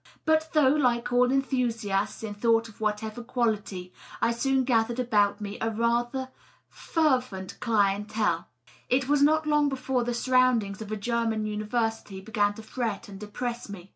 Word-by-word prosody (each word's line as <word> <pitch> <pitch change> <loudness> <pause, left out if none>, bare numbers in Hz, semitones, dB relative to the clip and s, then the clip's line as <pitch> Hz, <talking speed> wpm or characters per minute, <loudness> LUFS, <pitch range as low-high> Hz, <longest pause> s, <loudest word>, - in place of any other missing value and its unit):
But 315 0 +2
though, 300 -4 +5
like 245 -4 +1
all 250 0 +4
enthusiasts 235 -8 -1
in 215 -2 -4
thought 230 +2 +2
of 220 -1 -16
whatever 215 +2 -2
quality, 215 -7 -2 0.3
I - - +2
soon 265 +3 +1
gathered 235 -1 +1
about 205 -4 +2
me 205 -1 -6
a - - -1
certain 225 -1 -2
rather 240 +3 0 0.4
fervent 255 - -1
clienJtMey 210 -4 +1 0.4
it 260 +1 +2
was 290 0 +3
not 310 +2 +4
long 295 -1 +3
before 260 -2 -1
the 240 0 -2
surroundings 240 -5 +2
of 215 -1 -7
a 215 - -2
German 225 0 -1
university 215 -1 -2
began 205 0 0
to 220 - -10
fret 225 -4 -4
and 195 -1 -9
depress 235 +3 -5
me. 195 -2 -9
230 Hz, 160 wpm, -27 LUFS, 210-255 Hz, 0.4 s, though